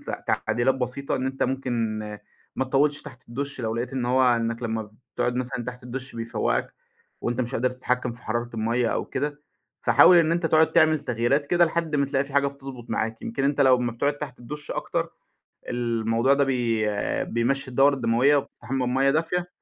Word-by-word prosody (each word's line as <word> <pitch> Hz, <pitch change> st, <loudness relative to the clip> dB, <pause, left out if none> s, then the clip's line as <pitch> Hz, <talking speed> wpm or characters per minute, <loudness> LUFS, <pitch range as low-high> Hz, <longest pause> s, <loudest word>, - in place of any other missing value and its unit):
ت -, -, -7 dB, 0.2 s
تعديلات 125 Hz, +2 st, +1 dB
بسيطة، 130 Hz, +2 st, -2 dB
إن 130 Hz, -, -2 dB
أنت 135 Hz, 0 st, -2 dB
ممكن 120 Hz, -4 st, -1 dB, 0.6 s
ما 130 Hz, -, +1 dB
تطوِّلش 145 Hz, +3 st, +1 dB
تحت 130 Hz, -5 st, -13 dB
الدُّش 140 Hz, +3 st, -4 dB
لو 110 Hz, -1 st, -2 dB
لقيت 120 Hz, +2 st, -3 dB
إن 130 Hz, -2 st, -2 dB
هو، 130 Hz, +1 st, +3 dB
إنّك 115 Hz, +1 st, -2 dB
لمّا 110 Hz, -2 st, -3 dB, 0.2 s
بتقعد 125 Hz, -, 0 dB
مثلًا 125 Hz, -1 st, -3 dB
تحت 125 Hz, 0 st, -7 dB
الدُّش 130 Hz, +2 st, -6 dB
بيفوَّقك 115 Hz, -1 st, -1 dB, 0.5 s
وأنت 120 Hz, +1 st, -1 dB
مش 120 Hz, +1 st, -3 dB
قادر 125 Hz, +2 st, +1 dB
تتحكِّم 125 Hz, -1 st, -2 dB
في 120 Hz, -, -13 dB
حرارة 120 Hz, +2 st, -2 dB
المَيَّة 115 Hz, +2 st, +1 dB
أو -, -, -1 dB
كده، 145 Hz, 0 st, -4 dB, 0.4 s
فحاول 180 Hz, -, +7 dB
إن 165 Hz, -1 st, +3 dB
أنت 170 Hz, -1 st, +1 dB
تقعد 160 Hz, 0 st, +4 dB
تعمل 155 Hz, -2 st, +4 dB
تغييرات 135 Hz, +2 st, 0 dB
كده 175 Hz, +3 st, +4 dB
لحد 165 Hz, -2 st, -1 dB
ما 140 Hz, -1 st, +2 dB
تلاقي 140 Hz, 0 st, 0 dB
في 140 Hz, -, -12 dB
حاجة 140 Hz, 0 st, +4 dB
بتضبُط 135 Hz, -3 st, -8 dB
معاك، 110 Hz, 0 st, -2 dB
يمكن 135 Hz, +4 st, -2 dB
أنت 145 Hz, 0 st, +1 dB
لو 130 Hz, -2 st, +6 dB
أمّا 120 Hz, -1 st, -1 dB
بتقعد 145 Hz, +5 st, -1 dB
تحت 140 Hz, -4 st, -7 dB
الدُّش 145 Hz, +5 st, -8 dB
أكتر، -, -, -2 dB, 0.6 s
الموضوع 115 Hz, +1 st, +1 dB
ده 140 Hz, -, +3 dB
بي 120 Hz, -5 st, 0 dB, 0.4 s
بيمشّي 130 Hz, +3 st, 0 dB
الدورة 135 Hz, +3 st, +4 dB
الدموية 125 Hz, +4 st, +3 dB
وبتستحمى 130 Hz, -1 st, -3 dB
بمَيَّة 135 Hz, +2 st, +3 dB
دافية 175 Hz, +3 st, 0 dB
130 Hz, 185 wpm, -25 LUFS, 120-140 Hz, 0.6 s, فحاول